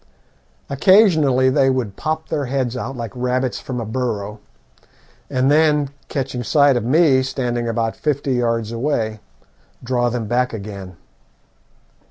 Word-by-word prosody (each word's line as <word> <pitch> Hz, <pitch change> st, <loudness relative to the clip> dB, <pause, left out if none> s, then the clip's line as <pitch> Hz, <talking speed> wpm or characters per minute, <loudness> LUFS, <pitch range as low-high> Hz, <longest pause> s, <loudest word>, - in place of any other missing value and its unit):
Occasionally 145 Hz, -, +4 dB
they 135 Hz, 0 st, +3 dB
would 125 Hz, -7 st, -1 dB
pop 160 Hz, 0 st, -3 dB
their 150 Hz, -3 st, -1 dB
heads 130 Hz, -2 st, -2 dB
out 130 Hz, +1 st, -5 dB
like 115 Hz, -3 st, -5 dB
rabbits 125 Hz, 0 st, -1 dB
from 125 Hz, -2 st, -5 dB
a 115 Hz, -, -4 dB
burrow, 110 Hz, -3 st, -3 dB, 0.9 s
and 130 Hz, +2 st, +1 dB
then, 150 Hz, -2 st, +3 dB, 0.2 s
catching 135 Hz, -3 st, -3 dB
sight 140 Hz, +3 st, +4 dB
of 120 Hz, -, 0 dB
me 135 Hz, +1 st, +4 dB
standing 120 Hz, -2 st, -2 dB
about 115 Hz, -1 st, -1 dB
fifty 140 Hz, -2 st, -1 dB
yards 115 Hz, -2 st, 0 dB
away, 115 Hz, -3 st, -1 dB, 0.6 s
draw 120 Hz, 0 st, 0 dB
them 120 Hz, -1 st, -3 dB
back 125 Hz, +3 st, 0 dB
again. 100 Hz, -4 st, -8 dB
125 Hz, 135 wpm, -20 LUFS, 115-140 Hz, 0.9 s, Occasionally